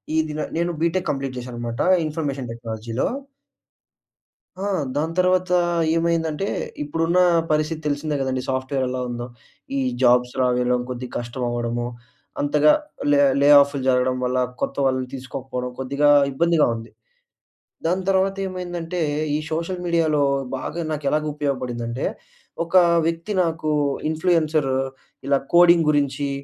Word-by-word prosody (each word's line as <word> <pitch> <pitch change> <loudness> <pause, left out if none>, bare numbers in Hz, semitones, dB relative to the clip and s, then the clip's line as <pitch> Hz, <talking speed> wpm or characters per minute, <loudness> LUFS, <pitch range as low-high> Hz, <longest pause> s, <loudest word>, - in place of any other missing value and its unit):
ఈ - - +2
దిన 150 0 -5 0.2
నేను 170 +1 0
బీటెక్ 170 +2 0
కంప్లీట్ 135 -2 -2
జేశానన్నమాట 120 0 -5 0.2
ఇన్ఫర్మేషన్ 145 -5 -3
టెక్నాలజీలో. 115 0 -3 1.5
ఆ! - - -4 0.3
దాని 160 +3 -1
తర్వాతా 185 0 +3 0.4
ఏమైందంటే 165 +2 0 0.4
ఇప్పుడున్నా 165 +4 +1 0.3
పరిస్థితి 155 +1 0
తెలిసిందే 145 +1 -1
గదండీ 130 -1 -1
సాఫ్ట్‌వేర్ 130 0 -1
ఎలావుందో. 125 -1 -3 0.5
ఈ - - +1 0.2
జాబ్స్ 125 0 +4
రావడం, 125 0 +2
కొద్దిగా 125 0 -6
కష్టం 120 +1 -5
అవ్వడము 120 0 -2 0.6
అంతగా 150 +1 +4 0.4
లె 145 - +4 0.2
లే 145 - +5
ఆఫ్‌లు 140 -1 -1
జరగడం 125 0 +2
వల్ల, 125 +1 0 0.2
కొత్త - - -2
వాళ్ళని 130 -1 0
తీసుకోకపోవడం, 130 -1 -5
కొద్దిగా 140 +3 +2 0.2
ఇబ్బందిగా 165 +2 +3
ఉంది. 115 0 -9 1.0
దాని 185 +2 0
తర్వాత 195 0 +2
ఏమైందంటే 175 -2 -4 0.3
ఈ - - +2
సోషల్ 170 +3 -2
మీడియాలో 160 -4 +2 0.4
బాగా 170 +5 -4
నాకెలాగు 150 +1 -1
ఉపయోగపడిందంటే, 125 -4 -3 0.6
ఒక 170 - -5 0.3
వ్యక్తి 165 +5 -3
నాకు 160 -2 -1 0.4
ఇన్‌ఫ్లూయెన్సర్ 155 -4 +1 0.6
ఇలా 140 -1 +3 0.2
కోడింగ్ 170 -2 +6
గురించీ, 145 -1 +1
145 Hz, 120 wpm, -22 LUFS, 125-165 Hz, 1.5 s, కోడింగ్